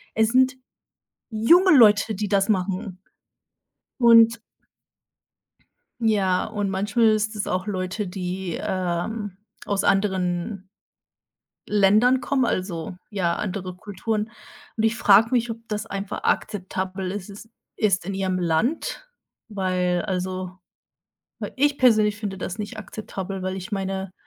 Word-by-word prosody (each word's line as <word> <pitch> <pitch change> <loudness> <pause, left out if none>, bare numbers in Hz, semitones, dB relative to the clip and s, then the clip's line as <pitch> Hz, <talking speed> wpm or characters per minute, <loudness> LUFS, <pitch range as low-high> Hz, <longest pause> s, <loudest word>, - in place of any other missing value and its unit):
Es 220 0 +3
sind 260 +1 +4 0.8
junge 335 - +5
Leute, 215 -2 +5
die 205 +1 -3
das 200 0 +2
machen. 185 -1 -1 1.0
Und 230 -1 +6 1.6
Ja, 195 -5 +2
und 205 -2 -3
manchmal 205 +4 +1
ist 215 0 0
es 205 - -3
auch 185 +1 -1
Leute, 190 +1 -3
die, 180 -1 -4
ähm, 185 +3 -3 0.3
aus 200 -1 0
anderen 190 -1 0 1.1
Ländern 215 +6 +4
kommen, 265 -3 +1
also, 180 -4 -3
ja, 185 -5 0
andere 185 -3 -4
Kulturen. 210 +3 -3 0.5
Und 220 - 0
ich 225 +1 +2
frage 215 +2 +5
mich, 240 -2 +1
ob 225 - -6
das 210 0 -3
einfach 195 -2 -5
akzeptabel 190 -1 -2
is 200 0 -6
is 210 +3 -11 0.3
ist 195 -5 +1
in 195 - -3
ihrem 185 -1 -1
Land, 220 - -1 0.4
weil, 185 -3 0
also, 185 -1 -4 1.0
ich 285 +1 +2
persönlich 215 -4 +4
finde 205 -2 -5
das 185 +2 -5
nicht 215 +2 -6
akzeptabel, 195 -2 -6
weil 185 0 -2
ich 185 -1 -7
meine, 195 -1 -3
200 Hz, 125 wpm, -24 LUFS, 185-220 Hz, 1.6 s, Und